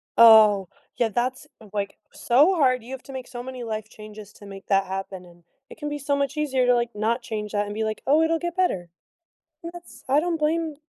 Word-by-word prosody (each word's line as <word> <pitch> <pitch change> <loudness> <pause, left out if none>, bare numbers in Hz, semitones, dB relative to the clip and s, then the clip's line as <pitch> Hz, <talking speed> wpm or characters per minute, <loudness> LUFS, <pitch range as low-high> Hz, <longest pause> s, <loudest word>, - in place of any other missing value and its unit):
Oh, 215 -5 +7 0.3
yeah, 235 -2 +1
that's, 255 +6 -2 0.3
like, 200 -1 -3
so 290 +10 +3
hard. 255 -7 +2
You 245 - -11
have 265 -1 -7
to 270 - -11
make 260 -1 -7
so 245 -1 -7
many 255 -1 -7
life 220 -2 -5
changes 215 -1 -12
to 205 - -15
make 195 -1 -11
that 195 -1 +2
happen, 190 -1 -6
and 175 -1 -19 0.3
it - - -12
can 295 -2 -4
be 295 - -4
so 285 +1 0
much 280 +1 -2
easier 270 -4 +1
to, 245 - +4
like, 235 -2 -2
not 230 +4 0
change 210 -3 -5
that 205 -1 0
and 205 - -6
be 220 +1 -2
like, 215 0 -3
"Oh, 300 +4 +4
it'll 325 0 +1
get 345 0 -4
better." 195 - 0 0.7
That's 340 +1 -11
I 280 +3 +4
don't 345 0 -1
blame 315 0 -1
240 Hz, 225 wpm, -24 LUFS, 210-290 Hz, 0.7 s, Oh